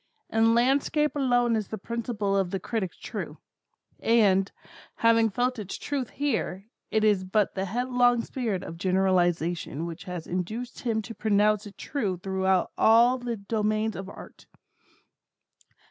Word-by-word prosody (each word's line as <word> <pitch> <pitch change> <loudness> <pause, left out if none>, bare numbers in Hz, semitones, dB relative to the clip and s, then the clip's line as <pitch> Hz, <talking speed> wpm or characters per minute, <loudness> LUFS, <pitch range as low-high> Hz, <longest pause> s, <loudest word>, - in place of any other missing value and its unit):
In 225 +1 +4
landscape 280 +5 +2
alone 245 -4 +2
is 215 -3 -2
the 220 - -5
principle 215 -2 -2
of 195 -2 +1
the 195 - -2
critic 200 -5 -3
true; - - -6 0.6
and, 200 -4 +3 0.4
having 230 -1 +4
felt 245 +3 -1
its 200 -2 -5
truth 275 -4 -3
here, 230 -9 -2 0.2
it 220 - +1
is 205 -3 +3
but 200 +2 +1
the 190 0 -2
headlong 245 +2 +2
spirit 220 -8 -3
of 165 -2 -8
generalization 175 -4 +1
which 170 -1 -7
has 180 -3 -6
induced 215 +8 -4
him 225 -3 -1
to 230 - -8
pronounce 210 -1 +2
it 205 - -13
true 205 -11 -2
throughout 190 0 0
all 235 +3 +5
the 240 -2 -3
domains 215 +1 -1
of 190 0 -6
Art. - - -12
215 Hz, 145 wpm, -27 LUFS, 190-235 Hz, 0.6 s, all